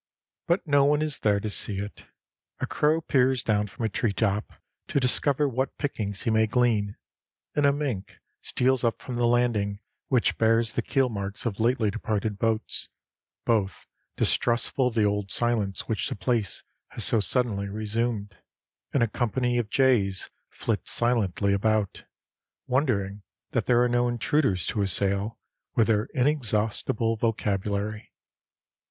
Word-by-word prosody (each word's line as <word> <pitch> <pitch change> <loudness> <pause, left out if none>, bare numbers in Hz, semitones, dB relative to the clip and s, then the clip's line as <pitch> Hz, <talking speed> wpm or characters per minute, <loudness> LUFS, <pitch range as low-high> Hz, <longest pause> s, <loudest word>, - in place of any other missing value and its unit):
But 175 +3 +1
no 145 -3 +4
one 150 +1 +2
is 155 -3 0
there 105 -2 +2
to 105 - -4
see 100 -1 +1
it. 100 +1 -7 0.5
A - - -1
crow 155 +2 +1
peers 130 -4 +2
down 105 -1 +1
from 115 +3 -5
a - - 0
treetop 105 0 -1 0.3
to - - +1
discover 140 +3 +2
what 130 +1 -2
pickings 105 -9 -3
he 115 - +1
may 110 0 +3
glean, 110 -4 +1 0.6
and 145 -1 +3
a - - +5
mink 140 -9 -4 0.2
steals 130 0 +1
up 115 -1 0
from 125 - -6
the 120 0 +2
landing, 115 -4 +1 0.3
which 125 -4 +1
bears 115 0 +3
the - - 0
keelmarks 110 -7 -2
of 110 -3 -2
lately 115 -2 +2
departed 105 -1 -2
boats, 115 -1 -1 0.6
both 105 -5 0 0.3
distrustful 125 +2 +1
of 120 - -4
the 110 - +3
old 105 -1 0
silence 110 -3 +2
which 110 - -2
the - - -3
place 105 +2 -1 0.2
has - - -1
so 115 - +5
suddenly 105 -3 +1
resumed; 105 0 -2 0.6
and 130 - +4
a - - +2
company 120 +2 0
of 110 -3 -3
jays 105 -9 +2 0.2
flit - - -3
silently 105 -4 +1
about, 105 0 0 0.6
wondering 105 -7 0 0.3
that - - -1
there 120 0 +4
are - - +3
no 120 0 +1
intruders 120 - +1
to 105 - -1
assail 100 +3 +1 0.4
with 115 - +4
their 105 -1 +1
inexhaustible 115 -4 +1
vocabulary. 105 -1 -2
115 Hz, 145 wpm, -26 LUFS, 105-125 Hz, 0.6 s, a